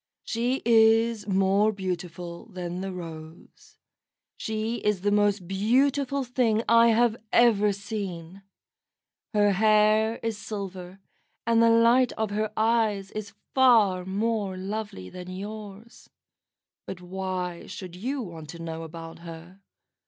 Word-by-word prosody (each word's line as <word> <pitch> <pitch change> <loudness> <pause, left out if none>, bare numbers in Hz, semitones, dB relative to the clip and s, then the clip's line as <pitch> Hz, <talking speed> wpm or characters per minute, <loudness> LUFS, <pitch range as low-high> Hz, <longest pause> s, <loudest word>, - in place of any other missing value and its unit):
"She 245 +3 -1
is 225 -1 +4
more 195 +2 +3
beautiful 180 -3 -5
than 180 0 -5
the 195 0 -4
rose. 170 - -11 0.6
She 220 +2 -3
is 210 -5 0
the 205 +1 +1
most 205 -3 +2
beautiful 265 +8 +1
thing 235 -3 +1
I 230 +1 +6
have 230 0 +3
ever 210 -4 +4
seen. 195 -3 -6 0.9
Her 205 -1 +4
hair 215 +2 +3
is 225 -2 -2
silver, 190 -4 -7 0.5
and 230 0 +3
the 230 - +6
light 235 +2 +4
of 220 -2 -2
her 215 +1 -1
eyes 220 -3 +1
is 210 -2 -6 0.2
far 220 -8 +4
more 200 0 -2
lovely 195 - -5
than 180 0 -9
yours. 205 +3 -9 0.8
But 190 - -6
why 180 -1 -4
should 180 -3 -8
you 255 +8 -3
want 165 -5 -9
to 170 - -9
know 165 -1 -5
about 165 0 -9
her? 170 +2 -11
205 Hz, 125 wpm, -26 LUFS, 185-225 Hz, 0.9 s, I